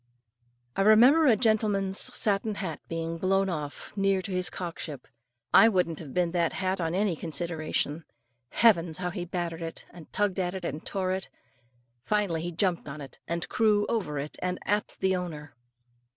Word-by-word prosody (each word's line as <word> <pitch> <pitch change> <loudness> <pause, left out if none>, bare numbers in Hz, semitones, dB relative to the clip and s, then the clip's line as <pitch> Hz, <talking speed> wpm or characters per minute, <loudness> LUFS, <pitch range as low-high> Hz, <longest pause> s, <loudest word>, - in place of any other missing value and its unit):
I - - +1
remember 245 +10 +6
a 235 - +6
gentleman's 205 -4 +1 0.2
satin 210 0 +1
hat 165 -7 -4
being 165 0 -3
blown 195 +1 +2
off 150 -4 -5
near 195 -1 +1
to 195 - -5
his 185 -1 0
cockship. 165 -6 -6 0.5
I 225 - +8
wouldn't 180 -6 0
have 150 -5 -8
been 175 +1 +1
that 170 -2 +1
hat 185 -1 -1
on 165 +1 -1
any 195 -2 +1
consideration. 160 -1 -2 0.4
Heavens! 170 - +3
how 180 -1 -3
he 175 -1 -4
battered 170 -1 -4
it, 165 0 -6
and 170 -2 -13
tugged 205 -2 0
at 180 0 -1
it, 190 - -5
and 150 +3 -4
tore 190 -2 -2
it; 190 0 -3 0.7
finally 200 -5 0
he 175 +1 -3
jumped 175 -2 0
on 145 +2 -7
it, 140 -2 -10
and 170 0 -2
crew 210 -2 +2
over 190 -11 -1
it 145 +2 -5
and 180 0 -1
at 205 +1 -1
the 190 0 +2
owner. 155 -5 -5
180 Hz, 175 wpm, -28 LUFS, 165-195 Hz, 0.7 s, I